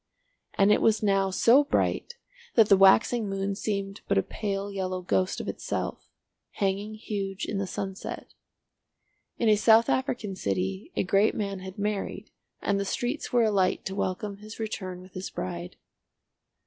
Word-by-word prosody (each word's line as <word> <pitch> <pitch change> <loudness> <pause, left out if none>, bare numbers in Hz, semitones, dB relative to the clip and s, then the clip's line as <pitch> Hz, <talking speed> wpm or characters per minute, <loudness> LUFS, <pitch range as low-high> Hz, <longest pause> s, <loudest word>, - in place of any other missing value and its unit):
And 200 +1 +4
it - - +4
was 220 -1 +3
now 195 -1 +2
so 235 +9 +5
bright 475 +10 0 0.4
that 225 -3 +6
the 195 - +8
waxing 205 +3 +5
moon 195 0 -1
seemed 195 -1 -3
but - - +2
a 95 - +3
pale 200 -1 -3
yellow 185 -2 -3
ghost 185 +1 0
of - - -5
itself, - - -4 0.4
hanging 200 +1 -1
huge 195 -3 -4
in 200 - -3
the 195 - -2
sunset. 190 0 -6 1.0
In 235 - +1
a 215 - +6
South 225 +2 +5
African 240 -6 -1
City 95 - -2
a - - +1
great 195 +3 +3
man 200 -2 -3
had 190 0 -9
married, 205 0 -3 0.3
and 200 -1 +1
the - - 0
streets 245 +8 -3
were 240 -1 +4
alight 200 -4 +1
to 190 - -3
welcome 200 +1 -2
his 215 +2 -11
return 185 -5 -4
with 185 0 -15
his 185 +1 -5
bride. 90 -1 -5
200 Hz, 160 wpm, -27 LUFS, 190-215 Hz, 1.0 s, the